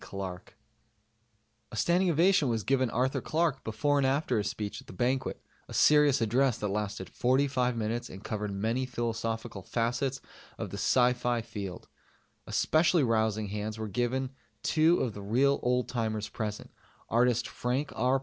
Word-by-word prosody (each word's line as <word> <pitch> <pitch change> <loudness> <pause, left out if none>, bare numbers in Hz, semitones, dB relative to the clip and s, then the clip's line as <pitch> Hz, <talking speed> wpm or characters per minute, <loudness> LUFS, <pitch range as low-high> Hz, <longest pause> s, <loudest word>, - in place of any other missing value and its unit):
Clarke. 95 -2 -7 1.1
A - - -7
standing 175 +8 +2
ovation 170 -3 +4
was 115 -3 -1
given 130 0 +2
Arthur 130 +3 0
Clarke 155 -4 0
before 140 +7 +1
and 135 - +3
after 135 -3 +1
his 105 0 -1
speech 105 0 -5
at - - -20
the - - -10
Banquet, 130 +6 -1 0.3
a - - -8
serious 150 -3 +5
address 120 +3 +2
that 105 - -2
lasted 100 -2 -3
forty 130 +3 +2
five 125 -3 0
minutes 115 +2 -2
and 95 +2 -10
covered 105 -1 -3
many 115 +6 -1
philosophical 115 -3 -3
facets 125 +6 -1 0.4
of - - -5
the - - -5
s.f. 125 -2 +2
field. 100 -5 -6 0.6
Especially 160 0 +3
rousing 110 -3 +1
hands 105 +1 -4
were 110 0 -4
given 125 +5 -1 0.3
two 165 +2 +4
of 120 - -1
the 105 - -8
real 130 +8 +2
old 125 0 +1
timers 110 -3 -2
present, 105 -2 -5 0.4
artist 120 0 +2
Frank 130 +4 -2
R. 130 +2 +2
120 Hz, 160 wpm, -29 LUFS, 110-135 Hz, 1.1 s, serious